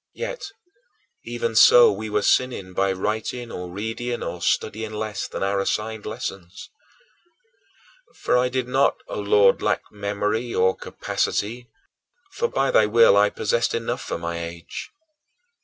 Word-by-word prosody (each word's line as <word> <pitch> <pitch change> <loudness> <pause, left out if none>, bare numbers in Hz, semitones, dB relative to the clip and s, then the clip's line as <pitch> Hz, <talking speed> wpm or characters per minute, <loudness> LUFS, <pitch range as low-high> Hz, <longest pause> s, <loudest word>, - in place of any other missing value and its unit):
Yet, - - -5 0.8
even 470 0 -3
so, 480 -1 +8
we 110 - -5
were 105 0 0
sinning 100 -8 +1
by 95 +1 +1
writing 110 +5 -3
or 90 0 -6
reading 110 +5 -4
or 90 - -5
studying 110 +4 -1
less 105 -2 -4
than - - -5
our 100 0 0
assigned 110 +2 -2
lessons. 100 -5 -7 1.4
For - - 0
I 125 0 +3
did 125 -1 -2
not, 135 +2 +2
O - - -4
Lord, 100 -1 +4
lack - - 0
memory 105 +3 -2
or 95 +1 +3
capacity, 120 +4 -3 0.6
for, 475 - 0
by 135 - 0
thy 110 - +4
will, 115 -1 +6
I 105 0 +5
possessed 115 +3 0
enough 120 +2 -3
for - - -4
my 85 0 -4
age. 85 0 -8
110 Hz, 140 wpm, -23 LUFS, 100-120 Hz, 1.4 s, so